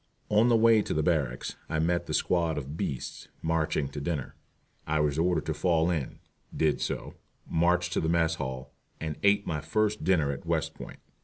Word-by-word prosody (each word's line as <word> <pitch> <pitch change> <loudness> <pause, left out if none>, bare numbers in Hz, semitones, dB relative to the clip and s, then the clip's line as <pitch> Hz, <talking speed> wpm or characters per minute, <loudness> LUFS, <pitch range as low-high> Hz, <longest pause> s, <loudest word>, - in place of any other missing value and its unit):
On 105 +3 +4
the 120 -1 +5
way 115 -1 +6
to 75 -6 -1
barracks 70 -7 -1
I 80 - -1
met 85 +2 +1
the - - -1
squad 85 -3 +1
of 70 +1 -5
"beasts" 70 -5 -4 0.2
marching 80 -3 0
to 70 +1 -6
dinner. 75 -4 -3 0.5
I 75 0 +1
was 75 0 +1
ordered 85 -2 +1
to - - -1
fall 85 -1 +2
in, 80 -7 -3 0.4
did 80 -2 +2
so, - - -3 0.3
marched 90 +2 +2
to - - +1
the 80 - 0
mess 80 -1 +2
hall, 65 -1 -5 0.3
and 80 -2 -3
ate 100 0 +4
my 75 -3 -2
first 105 +6 0
dinner 80 -5 +3
at 70 - -6
West - - -1
Point. - - -10
80 Hz, 185 wpm, -28 LUFS, 75-90 Hz, 0.5 s, way